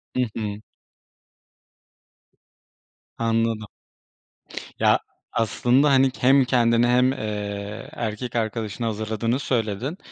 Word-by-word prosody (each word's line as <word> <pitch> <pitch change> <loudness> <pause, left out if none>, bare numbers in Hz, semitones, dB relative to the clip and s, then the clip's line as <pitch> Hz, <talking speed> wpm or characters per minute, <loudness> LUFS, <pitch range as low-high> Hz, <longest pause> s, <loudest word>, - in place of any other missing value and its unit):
Hı 130 - +2 0.2
hı. 105 -1 -4 2.6
Anladım. 115 -1 0 1.1
Ya, - - +4 0.3
aslında, 125 +5 +2
hani, 135 -1 +4
hem 135 +1 +5
kendini 120 -1 +3
hem, 125 +1 +4
eee, 105 -1 -5
erkek 120 -4 -4
arkadaşını 115 0 -2
hazırladığını 110 +3 -1
söyledin. 120 - -2
115 Hz, 85 wpm, -24 LUFS, 110-125 Hz, 2.6 s, hem